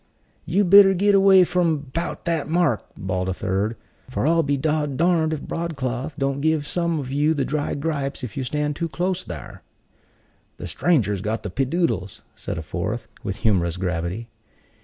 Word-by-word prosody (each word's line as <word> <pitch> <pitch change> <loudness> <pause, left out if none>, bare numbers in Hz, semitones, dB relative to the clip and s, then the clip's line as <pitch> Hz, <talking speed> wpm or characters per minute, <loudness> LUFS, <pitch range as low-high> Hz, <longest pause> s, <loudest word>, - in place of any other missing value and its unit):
"You 195 +5 +2
better 195 +1 +7
git 200 +3 +3
away 195 -1 +7
from 175 -3 +1 0.2
'bout 170 +1 -3
that 165 -4 0
mark!" 165 - +2
bawled 95 -1 -2
a 95 - -2
third, 100 +5 -1 0.3
"for 130 - -2
I'll 165 +2 +4
be 140 -2 0
dod 150 -1 -1
darned 165 -2 +2
if 155 -2 -3
Broadcloth 140 -4 -3
don't 135 0 -1
give 155 -1 +1
some 170 -2 0
of 130 -2 -5
you 150 +3 +2
the 140 - 0
dry 150 -1 -2
gripes 140 -3 -3
if 115 -5 -6
you 135 - -2
stand 150 +3 -1
too 165 +2 -3
close 180 +3 -1
thare." 80 -8 -8 1.0
"The - - -7
stranger's 105 - +1
got 110 +2 -2
the 105 - -5
peedoddles," 135 - -1
said - - -5
a 80 - -4
fourth, - - -4
with 95 - -3
humorous 90 -5 +2
gravity. 90 +4 -3
145 Hz, 175 wpm, -23 LUFS, 110-170 Hz, 1.0 s, better